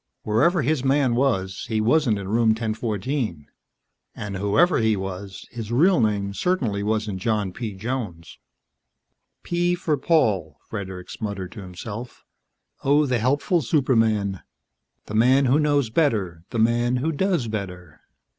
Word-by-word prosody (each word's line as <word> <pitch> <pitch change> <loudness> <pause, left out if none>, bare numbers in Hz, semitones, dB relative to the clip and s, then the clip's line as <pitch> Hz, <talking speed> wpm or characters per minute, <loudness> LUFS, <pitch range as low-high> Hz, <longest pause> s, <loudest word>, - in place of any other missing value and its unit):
Wherever 150 - +2
his 145 0 0
man 135 -2 +2
was, 105 -8 0
he 110 -1 0
wasn't 120 0 +3
in 100 -1 -6
Room 115 +2 +2
1014. 110 - -2 0.7
And 100 -2 -5
whoever 105 - +3
he 110 -2 +2
was, 95 0 -6
his 115 -2 -6
real 165 +5 +4
name 100 -2 0
certainly 120 - 0
wasn't 105 -2 -1
John 105 -2 -1
P. 110 -3 -5
Jones. 105 -6 -5 1.0
"P 175 0 +1
for 160 -4 -1
Paul," 105 - +1
Fredericks 95 -3 -7
muttered 100 -4 -4
to 110 - -9
himself. 100 +6 -8 0.6
"Oh, 145 +2 +4
the 125 -3 0
helpful 145 - +1
superman, 110 - +1 0.6
the - - -8
man 130 +5 +4
who 130 +4 +3
knows 145 -6 +1
better, 100 - 0
the - - -4
man 120 +2 +2
who 140 +6 0
does 170 -5 0
better." 90 -6 -6
110 Hz, 135 wpm, -23 LUFS, 100-135 Hz, 1.0 s, real